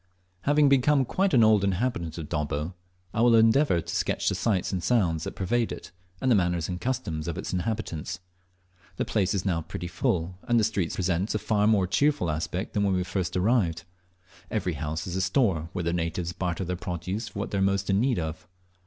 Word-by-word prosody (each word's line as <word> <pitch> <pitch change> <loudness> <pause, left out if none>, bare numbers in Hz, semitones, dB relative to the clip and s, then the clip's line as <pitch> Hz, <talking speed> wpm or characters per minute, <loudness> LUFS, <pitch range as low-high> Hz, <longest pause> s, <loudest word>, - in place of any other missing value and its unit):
Having 145 0 +4
become 140 0 +4
quite 190 +9 +1
an 120 - +5
old 110 -2 +5
inhabitant 95 -4 -1
of 80 -3 -5
Dobbo, 75 +3 -2 0.4
I 110 - 0
will 120 -1 +6
endeavour 115 - +4
to - - -5
sketch - - 0
the - - -1
sights 100 -6 0
and 95 -2 -2
sounds 90 -7 +1
that - - -5
pervade 115 +5 0
it, - - -8 0.3
and 130 -1 +1
the - - +6
manners 85 -3 +1
and 90 -1 -5
customs 85 -12 -2
of 85 - -3
its - - -4
inhabitants. 90 -3 -3 0.8
The - - -1
place 100 -1 0
is 95 - -2
now 85 -4 +1
pretty 85 +2 -6
full, 85 +1 -1
and 120 -1 +4
the - - +2
streets 100 -5 0
present 95 +3 0
a - - +3
far 105 -1 +1
more 105 -4 +4
cheerful 140 - +1
aspect 80 +5 -3
than 105 - +1
when 100 -1 +2
we 90 - +1
first 95 -1 -2
arrived. 90 -5 +1 0.7
Every 90 - -1
house 75 +2 -4
is 90 - -4
a 95 - 0
store, 95 - +1
where 90 - -3
the 85 +1 0
natives 85 0 -2
barter 90 0 -2
their 90 +1 -2
produce 90 +5 -4
for 100 - -10
what 100 - -3
they 100 - 0
are - - +1
most 100 0 +1
in 95 0 +2
need 125 +1 +2
of. 80 -1 -4
95 Hz, 215 wpm, -27 LUFS, 85-110 Hz, 0.8 s, will